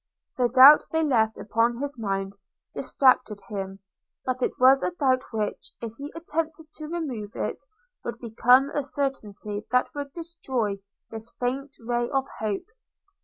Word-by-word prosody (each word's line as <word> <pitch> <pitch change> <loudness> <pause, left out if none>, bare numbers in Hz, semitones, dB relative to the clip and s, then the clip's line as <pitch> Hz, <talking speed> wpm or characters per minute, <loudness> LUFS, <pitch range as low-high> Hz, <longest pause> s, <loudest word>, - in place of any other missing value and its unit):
The 250 -1 +2
doubt 265 +4 +9
they 320 0 +2
left 225 -7 +2
upon 230 +3 +1
his 285 +2 -4
mind 195 -3 -3 0.4
distracted 255 -6 +2
him; 195 -2 -5 0.4
but 255 0 -2
it - - +1
was 265 +2 +7
a - - +1
doubt 270 -7 +1
which, 215 -2 -3
if 230 -2 -6
he 285 +2 -6
attempted 320 -1 -4
to 310 0 -8
remove 270 -11 -4
it, - - -3 0.4
would 235 - -4
become 245 +4 +4
a 290 - 0
certainty 220 -7 -4
that 250 0 +1
would 285 -1 -5
destroy 270 - -3 0.3
this 225 +1 -6
faint 265 +3 -2
ray 240 +1 -1
of 270 -1 0
hope. 210 -3 -2
250 Hz, 150 wpm, -26 LUFS, 220-285 Hz, 0.4 s, doubt